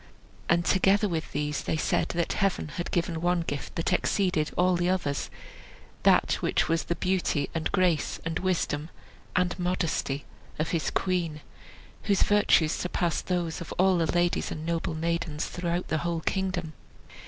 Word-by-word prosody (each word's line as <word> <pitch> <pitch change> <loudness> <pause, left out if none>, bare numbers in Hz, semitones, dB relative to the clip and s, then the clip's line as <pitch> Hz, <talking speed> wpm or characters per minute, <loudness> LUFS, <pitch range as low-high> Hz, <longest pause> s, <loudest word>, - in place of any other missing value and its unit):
And 170 +1 +3
together 195 +3 +4
with 165 -4 -3
these 150 -1 -1
they - - -1
said - - +1
that 170 0 -1
Heaven 195 -6 0
had 175 +2 -4
given 170 -2 -1
one 175 0 +2
gift 145 -4 -5
that 165 - 0
exceeded 180 -6 +1
all 180 0 +4
the 175 +1 +1
others, 170 -7 -1 1.1
which - - +1
was 165 0 0
the 170 - -1
beauty, 180 -6 0
and 165 -1 -1
grace, 180 -6 +1
and 165 0 -1
wisdom, 165 -4 -1 0.5
and 180 0 +1
modesty 165 -6 -1 0.3
of 155 - -1
his 165 -3 0
queen, 170 -5 -1 0.6
whose 200 -2 +3
virtues 205 -6 +4
surpassed 175 -2 -1
those 175 -2 -1
of 170 - -7
all 185 -1 +4
the 165 -2 +1
ladies 175 0 +1
and 155 0 -5
noble 165 -1 -1
maidens 165 -1 -1
throughout 175 0 -3
the 155 - +1
whole 170 0 -2
kingdom. 185 -3 -2
170 Hz, 155 wpm, -28 LUFS, 160-180 Hz, 1.1 s, together